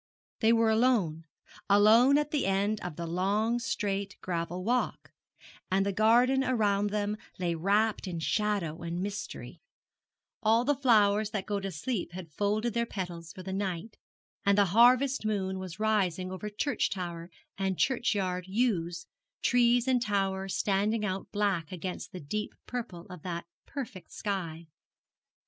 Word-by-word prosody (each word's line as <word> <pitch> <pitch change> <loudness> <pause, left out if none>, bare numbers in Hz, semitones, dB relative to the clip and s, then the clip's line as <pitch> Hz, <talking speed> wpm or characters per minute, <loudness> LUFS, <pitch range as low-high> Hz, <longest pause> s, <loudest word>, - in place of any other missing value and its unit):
They 225 0 +4
were 230 -1 +4
alone 220 -9 +2 0.4
alone 220 +7 +6
at 295 0 0
the 290 -9 0
end 200 +2 +1
of 180 -3 -5
the 170 - -4
long, 200 +7 +1
straight 200 -5 -2
gravel 175 0 -3
walk 245 +4 -1 0.6
and 195 +1 +2
the 200 - +1
garden 245 +6 +4
around 205 -5 +1
them 210 0 -1 0.2
lay 175 -2 0
wrapped 200 +5 +1
in 175 -2 -4
shadow 190 -3 -1
and 170 +1 -3
mystery; 205 0 -6 0.8
all 225 +2 +3
the 290 - +3
flowers 215 -6 +3
that 205 -3 -3
go 205 -1 -1
to 195 0 -4
sleep 180 +3 -3
had 175 -3 -8
folded 210 +6 0
their 235 0 0
petals 175 -5 -5
for 185 - -10
the 190 +1 -5
night, 195 +1 -3 0.5
and 200 0 +3
the 205 - +6
harvest 250 +4 +5
moon 190 -3 -1
was 185 0 -7
rising 190 -4 +1
over 185 +3 -5
church 245 +8 0
tower 170 -2 -5 0.3
and 190 -2 -1
churchyard 190 -8 0
yews, 190 -6 0 0.4
trees 245 0 +4
and 255 -2 +3
tower 195 -3 0
standing 210 +3 0
out 190 -1 -4
black 195 -7 0
against 180 +1 -5
the 185 - -7
deep 210 +8 -4
purple 220 -9 -6
of 180 -3 -9
that 170 -1 -4 0.2
perfect 225 -10 -7
sky. 170 -6 -4
200 Hz, 150 wpm, -30 LUFS, 185-225 Hz, 0.8 s, alone